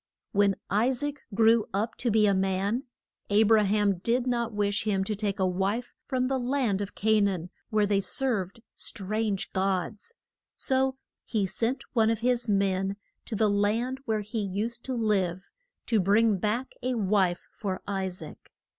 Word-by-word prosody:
When 200 -1 +3
I 215 +6 +2
saac 290 +3 -2 0.2
grew 225 0 +4
up 220 +3 -1
to 240 - 0
be 215 -1 +4
a 200 - +4
man, 195 +6 0 0.4
A 210 +2 +5
bra 220 0 +5
ham 200 -2 +2
did 240 +6 +1
not 235 -2 0
wish 205 -1 0
him 195 -3 +1
to 210 - -2
take 205 -1 -2
a 190 - +3
wife 195 +6 -1
from 255 -2 0
the 265 0 0
land 245 -6 0
of 200 - -5
Ca 220 0 +3
naan 185 -4 0 0.2
where 215 -1 +3
they 200 -1 +2
served 205 0 -1
strange 210 -1 -2
gods. 195 - -2 0.4
So 265 0 0 0.3
he 215 -4 0
sent 230 +7 -2
one 225 -3 +4
of 225 0 0
his 245 -1 +1
men 195 -1 +1 0.3
to 225 - -4
the 215 +1 +3
land 215 +6 +1
where 220 -2 0
he 215 +2 -4
used 210 +4 -3
to 260 - -2
live 195 -5 0 0.3
to 225 - +2
bring 205 +2 +3
back 220 +7 -1
a 255 0 -1
wife 195 -4 +1
for 190 -3 -4
I 195 -1 -1
saac. 175 -4 -8
210 Hz, 175 wpm, -28 LUFS, 195-235 Hz, 0.4 s, A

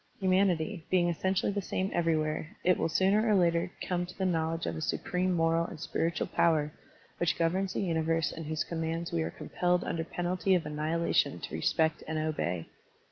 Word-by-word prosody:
Humanity, 185 -2 +1
being 175 -2 +3
essentially 190 +4 0
the 200 0 -1
same 190 0 -2
everywhere, 155 -2 0
it 180 0 +4
will - - +1
sooner 195 +7 +3
or 210 - +5
later 170 -2 +2 0.2
come 175 -1 0
to 180 - -12
the 190 - 0
knowledge 165 -2 0
of - - -2
a - - -5
supreme 180 +3 -1
moral 165 -1 +2
and - - -9
spiritual 165 +1 -1
power 155 -3 +2 0.5
which 175 - +1
governs 185 +3 0
the - - -1
universe 165 -3 +1
and 160 -2 -7
whose 155 0 -1
commands 165 0 -3
we 85 - 0
are 80 - -1
com - - -10
pelled 180 0 +1
under 165 - -2
penalty 180 +3 0
of 175 - 0
annihilation 155 +3 0
to - - -7
respect 160 - +1
and 160 - -2
obey. 150 - -1
170 Hz, 190 wpm, -30 LUFS, 160-185 Hz, 0.5 s, or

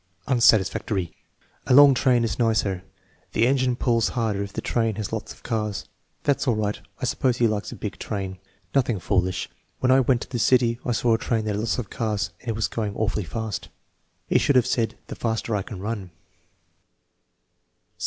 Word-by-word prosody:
Unsatisfactory. 105 -6 +2 0.5
"A 125 - +5
long 145 0 +9
train 125 -2 +3
is 115 - -2
nicer." 105 -5 +1 0.5
"The 115 - +3
engine 130 -1 +2
pulls 115 -2 +1
harder 110 -5 -1
if 100 -1 -4
the - - -4
train 115 -3 0
has 105 0 -4
lots 110 -1 -4
of - - -14
cars." 105 -4 -2 0.4
"That's 145 0 +1
all 120 - +3
right. 105 -1 -1 0.2
I 130 - -2
suppose 125 0 +1
he 120 - +4
likes 105 -2 -2
a - - -7
big - - -6
train." 95 -2 -4 0.3
"Nothing 120 -6 +2
foolish; 95 -1 0 0.3
when 130 - +3
I 130 - +6
went 125 -2 +2
to - - -6
the 120 - -2
city 120 0 +3
I 125 - -1
saw 115 +1 +2
a 110 - +2
train 115 -2 -1
that 105 - -1
had 105 - -1
lots 110 +1 0
of 125 -6 -5
cars 105 -5 -1
and 125 - -8
it 115 - 0
was 110 -2 0
going 105 -3 -3
awfully 105 -2 -1
fast." 110 +2 -4 0.6
"He - - +3
should 145 - +2
have 125 - +5
said, 115 -2 0
*the - - -7
faster 110 -1 -2
I 100 - 0
can 95 0 -8
run. 100 -2 -4
115 Hz, 195 wpm, -24 LUFS, 105-120 Hz, 0.6 s, long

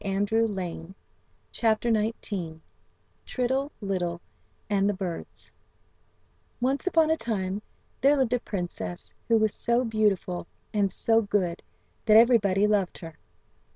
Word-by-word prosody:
[From 195 0 0
Ungarische 195 -5 -2 0.7
Mährchen] 215 -6 0 0.6
Tritill, 265 +3 -1
Litill, 180 -3 -2 0.5
And 200 -1 +2
The 205 - 0
Birds 185 -3 -7 1.0
Once 265 +7 0
upon 325 -3 +4
a - - +4
time 200 -7 -2 0.4
there 285 +2 +5
lived 260 -3 +1
a 245 - +2
princess 95 - -5
who 230 - +4
was 220 -1 +2
so 240 +2 +1
beautiful 205 -6 0 0.3
and 200 -2 +2
so 225 0 +3
good 200 -5 -1 0.5
that 215 0 +8
everybody 210 -4 +5
loved 205 -4 +1
her. 165 -3 -9
205 Hz, 120 wpm, -27 LUFS, 185-230 Hz, 1.0 s, that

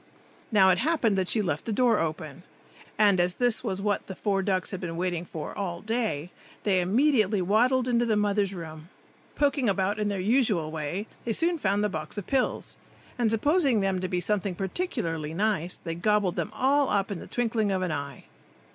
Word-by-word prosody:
Now, 190 -3 +6
it 180 - +2
happened 295 - +2
that 185 - -1
she 220 - +2
left 155 -5 -2
the 230 - -2
door 240 +2 +3
open, 155 -3 -4 0.6
and 205 -3 +4
as 175 +1 +1
this 245 -2 +1
was 195 -4 -3
what 205 -1 -1
the 190 - -6
four 195 0 0
ducks 190 -1 -1
had 190 - -4
been 165 -2 -5
waiting 175 -1 -2
for 160 -2 -7
all 180 -3 -4
day, 215 -8 -2 0.3
they 190 -3 +2
immediately 215 0 +2
waddled 240 +7 +2
into 240 -1 +2
the 220 - +2
mother's 205 -1 +1
room. 160 -3 -9 0.5
Poking 280 -4 +2
about 200 +2 0
in 210 - 0
their 200 -2 -2
usual 205 - +1
way, 160 +6 -3 0.2
they 230 - -1
soon 335 +6 +1
found 205 -3 +1
the - - +3
box 155 -2 -6
of 205 - -4
pills, 265 -2 -1 0.4
and 235 -2 +3
supposing 270 - +2
them 195 -1 0
to 185 - -2
be 180 0 -1
something 195 0 -1
particularly 175 - -3
nice, 190 -3 0
they 165 - -3
gobbled 200 +1 +1
them - - -2
all 280 +2 +2
up 200 0 0
in 190 - -4
the - - -9
twinkling 225 -3 0
of 185 -1 0
an 180 - -1
eye. 140 -3 -5
200 Hz, 200 wpm, -27 LUFS, 180-225 Hz, 0.6 s, Now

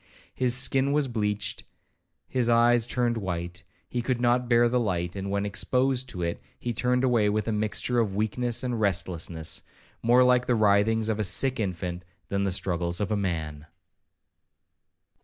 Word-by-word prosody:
—'His 125 -2 +1
skin 135 +2 +1
was 145 -2 +2
bleached, 105 -3 -2 0.6
his 125 -2 0
eyes 120 0 +4
turned 120 -2 0
white; 85 -3 -4 0.3
he 120 - -2
could 120 0 -1
not 125 0 +1
bear 120 0 +5
the 125 +1 +1
light; 90 -5 -2
and, 100 0 -4
when 100 +1 -1
exposed 125 +5 0
to 90 - -4
it, 85 0 -3 0.2
he 120 - -3
turned 125 +2 +1
away 120 -5 +3
with 105 +1 -1
a - - +1
mixture 110 +3 0
of 105 -4 0
weakness 115 +4 -1
and 120 -3 -2
restlessness, 85 -4 -2 0.4
more 120 +2 +5
like 125 0 +3
the 125 - +3
writhings 110 +1 +3
of 110 -1 -1
a - - +1
sick 130 +7 +1
infant 90 -3 -3 0.3
than 100 0 0
the 100 -1 0
struggles 85 -2 -1
of 105 0 -2
a - - +2
man.' 80 -6 -3
110 Hz, 170 wpm, -27 LUFS, 95-125 Hz, 0.6 s, bear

